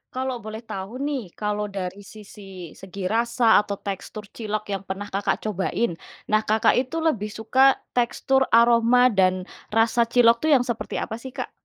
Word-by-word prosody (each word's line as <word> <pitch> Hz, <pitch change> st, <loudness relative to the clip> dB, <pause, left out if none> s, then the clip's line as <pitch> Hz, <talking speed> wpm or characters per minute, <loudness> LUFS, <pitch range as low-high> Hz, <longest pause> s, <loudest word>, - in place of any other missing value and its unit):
Kalau 255 Hz, -3 st, -3 dB
boleh 215 Hz, 0 st, -6 dB
tahu 225 Hz, +1 st, -7 dB
nih, 260 Hz, -11 st, -4 dB
kalau 210 Hz, 0 st, -2 dB
dari 195 Hz, +1 st, -5 dB
sisi 195 Hz, -4 st, -11 dB
segi 190 Hz, 0 st, -6 dB
rasa 230 Hz, +2 st, +3 dB
atau 200 Hz, -1 st, -5 dB
tekstur 200 Hz, +2 st, -6 dB
cilok 215 Hz, -2 st, -4 dB
yang 195 Hz, -2 st, -4 dB
pernah 195 Hz, +1 st, -6 dB
Kakak 195 Hz, 0 st, -1 dB
cobain, 200 Hz, 0 st, -1 dB, 0.3 s
nah, 215 Hz, 0 st, +2 dB
Kakak 220 Hz, +2 st, +3 dB
itu 260 Hz, +6 st, -1 dB
lebih 235 Hz, -11 st, -1 dB
suka 260 Hz, +5 st, +3 dB, 0.2 s
tekstur, 265 Hz, +2 st, +2 dB
aroma, 235 Hz, +1 st, +5 dB
dan 185 Hz, -4 st, +1 dB, 0.2 s
rasa 225 Hz, +2 st, +3 dB
cilok 235 Hz, 0 st, +4 dB
tuh 315 Hz, -, +2 dB
yang 255 Hz, -3 st, +4 dB
seperti 235 Hz, -2 st, -3 dB
apa 220 Hz, -, -4 dB
sih 255 Hz, +3 st, -9 dB
Kak? -, -, -6 dB
220 Hz, 165 wpm, -24 LUFS, 200-240 Hz, 0.3 s, aroma